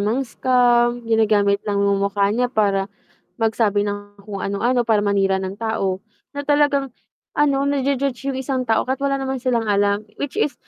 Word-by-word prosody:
mang-scam, 240 +1 +2
ginagamit 210 -3 +2
lang 205 - 0
yung 200 0 +2
mukha 200 0 +1
niya 245 +2 +1
para, 200 -4 +1 0.5
mag-sabi 220 -2 +1
ng 205 0 -7
kung 200 -1 -7
anu-ano 240 +5 0
para 220 -2 +3
manira 195 -2 +1
ng 190 +1 -4
tao, 200 -4 -2 0.3
na 285 - -3
talagang 290 -2 +2 0.4
ano, 280 -2 +2
naju-judge 275 -1 -1
yung 265 - -3
isang 265 0 -2
tao 225 - +2
kahit 260 +1 -2
wala 275 0 +1
naman 265 -1 -3
silang 235 -3 0
alam, 205 0 +1 0.2
which 285 -2 -4
is 290 - +1
225 Hz, 165 wpm, -21 LUFS, 200-265 Hz, 0.5 s, para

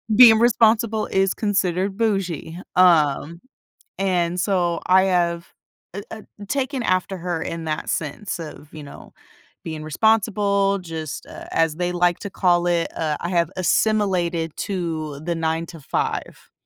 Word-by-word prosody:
Being 225 -2 +9
responsible 225 -2 +3
is 195 0 +1
considered 195 -2 -1
"bougie." 190 -7 -1 0.2
Um, 170 -2 +3 0.6
and 180 -2 0
so 180 -3 0
I 185 +1 +5
have, 170 -2 0 0.4
eh, 200 - -5
ah, 220 - -8 0.3
taken 270 0 -1
after 185 -2 0
her 175 -2 -3
in 165 0 -5
that 155 -1 -3
sense 165 +7 -3
of, 150 -2 -10
you 155 - -9
know, 140 - -12 0.5
being 160 -2 -5
responsible, 200 +2 +2
just 160 -4 -6
a - - -11
as 160 -2 +2
they 180 +1 -1
like 175 -1 +1
to 200 - -6
call 175 -2 +2
it, 170 -1 +1
uh, 155 -2 -1
I 170 - -3
have 170 -2 +1
assimilated 180 -4 +1
to 160 -6 -3
the 170 +2 -2
9 165 0 -1
to 165 -1 -11
5, 135 - -4
180 Hz, 145 wpm, -22 LUFS, 165-200 Hz, 0.6 s, Being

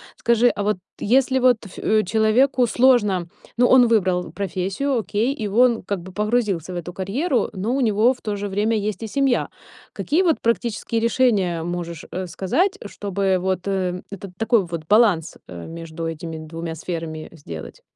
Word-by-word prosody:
Скажи, 235 +1 +3
а 205 - 0
вот 210 -1 +1 0.2
если 260 +3 +2
вот 250 -3 +3
ф 195 - -12 0.3
человеку 230 +5 +3
сложно 225 -8 +3 0.3
ну, 245 - +5
он 250 -2 +6
выбрал 185 -5 +1
профессию, 200 +8 -2
окей, 220 +5 0
и 220 -8 -4
он 235 +2 +3
как 195 -1 -3
бы 185 +2 -11
погрузился 210 -5 0
в - - -4
эту 175 +1 -6
карьеру, 235 - -1
но 210 +6 -2
у 275 - 0
него 225 +1 +3
в 250 - -19
то 210 -1 -3
же 205 0 -3
время 210 +3 0
есть 210 0 -3
и 225 - -3
семья. 270 +2 +1 0.4
Какие 320 +6 0
вот 330 -4 +2
практические 230 -1 -1
решения 210 -8 +2
можешь, 170 -1 -5
э, 185 +1 -4
сказать, 345 - 0
чтобы 195 -1 -1
вот, 185 +1 -2
э, 185 -2 -1
этот 195 -1 -8
такой 225 -3 +2
вот 170 -2 -5
баланс, 205 -7 +3
э, 85 -1 -8
между 165 0 -6
этими 165 0 -6
2 165 +1 -6
сферами 165 -1 -5
сделать? 85 - -9
205 Hz, 170 wpm, -22 LUFS, 180-235 Hz, 0.4 s, он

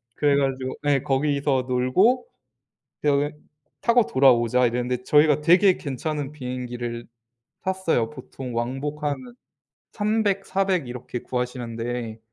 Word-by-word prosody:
그래가지고 135 -3 +1
네 140 -2 +2
거기서 140 -1 +1
놀고 130 - +2 0.8
데어게 145 0 +1 0.5
"타고 235 -1 +4
돌아오자" 125 -2 +4
이랬는데 125 +1 -2
저희가 150 0 +4
되게 180 +4 +5
괜찮은 145 +1 -4
비행기를 125 -3 -5 0.6
탔어요. 185 -11 0
보통 130 -3 -8
왕복 135 +5 -3
한 145 -1 +1 0.8
300, 205 -2 0
400 190 -7 0
이렇게 125 0 -6
구하시는데 120 -2 -4
135 Hz, 255 characters per minute, -24 LUFS, 125-150 Hz, 0.8 s, 되게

